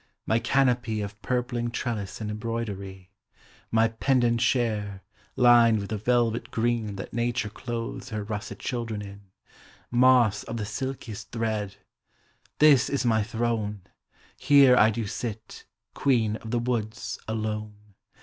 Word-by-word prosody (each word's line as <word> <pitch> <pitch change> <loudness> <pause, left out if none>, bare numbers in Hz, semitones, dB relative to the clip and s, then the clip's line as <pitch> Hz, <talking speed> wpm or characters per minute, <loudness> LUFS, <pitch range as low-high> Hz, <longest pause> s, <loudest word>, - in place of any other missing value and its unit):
my 110 - +2
canopy 125 -4 +1
Of 100 +1 -7
purpling 120 +3 -1
trellis 115 -4 -4
and 105 -1 -4
embroidery: 100 -4 -5 0.6
My 115 0 +3
pendant 120 0 +1
chair, 110 -5 0 0.3
lined 120 -2 +6
with 100 +1 -5
the 110 - -1
velvet 120 +1 +1
green 115 -3 -1
That 95 - -7
nature 120 -1 -1
clothes 115 +1 -5
her 105 -1 -3
russet 105 0 -5
children 115 -4 -4
in, 100 -1 -12 0.6
Moss 120 -4 +4
of 115 0 -6
the 105 - -3
silkiest 120 -1 -5
thread: 110 -4 -2 0.8
This 140 -4 +5
is 140 -2 -1
my 110 -2 +3
throne, 110 -2 -2 0.6
Here 140 -3 +6
I 110 -3 +6
do 115 0 -2
sit, 110 +1 -6 0.3
queen 115 -6 +1
of 110 - -10
the 120 - 0
woods, 115 -2 -3
alone 105 -1 -4
115 Hz, 130 wpm, -26 LUFS, 105-120 Hz, 0.8 s, lined